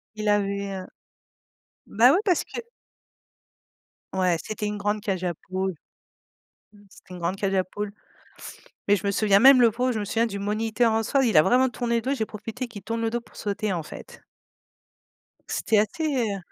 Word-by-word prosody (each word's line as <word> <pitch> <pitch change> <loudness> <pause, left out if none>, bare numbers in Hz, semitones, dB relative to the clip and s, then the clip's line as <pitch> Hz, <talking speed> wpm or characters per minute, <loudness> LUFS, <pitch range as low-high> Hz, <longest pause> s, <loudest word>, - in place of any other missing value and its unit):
Il 215 0 -4
avait, 200 -1 0
heu - - -10 1.0
bah, 240 +5 +5
oui, 370 - +3
parce 360 -4 +2
que - - -7 1.5
Ouais, 185 -2 +2
c'était 215 0 -4
une 210 0 -3
grande 205 +1 -1
cage 190 -3 -3
à 175 -1 -1
poule, 190 +2 -4 1.0
mmh, 205 - -20
c'était 185 - -15
une 180 - -8
grande 170 +3 -1
cage 195 0 -1
à 185 -1 +2
poule 205 +2 -5 1.0
mais 205 - +5
je 200 +1 -3
me - - +2
souviens 200 -1 +3
même 265 +1 +8
le 235 -2 +5
pauvre, 250 +3 0
je 225 - -2
me 205 - -3
souviens 230 +3 +1
du 200 -2 -5
moniteur, 220 +3 0
en 225 0 +1
soi. 270 +4 +1
Il 220 -9 +3
a - - +9
vraiment 255 +7 +3
tourné 235 -1 -2
le 230 - +1
dos 265 - -1
et - - +1
j'ai 220 -4 -2
profité 225 +4 -6
qu'il 205 -5 -11
tourne 230 +1 -3
le 225 - 0
dos 240 +1 -2
pour 235 - -22
sauter, 205 -1 -2
en 170 - -2
fait. - - -11 1.3
C'était 220 - +1
assez 240 - -1
210 Hz, 195 wpm, -25 LUFS, 200-235 Hz, 1.5 s, a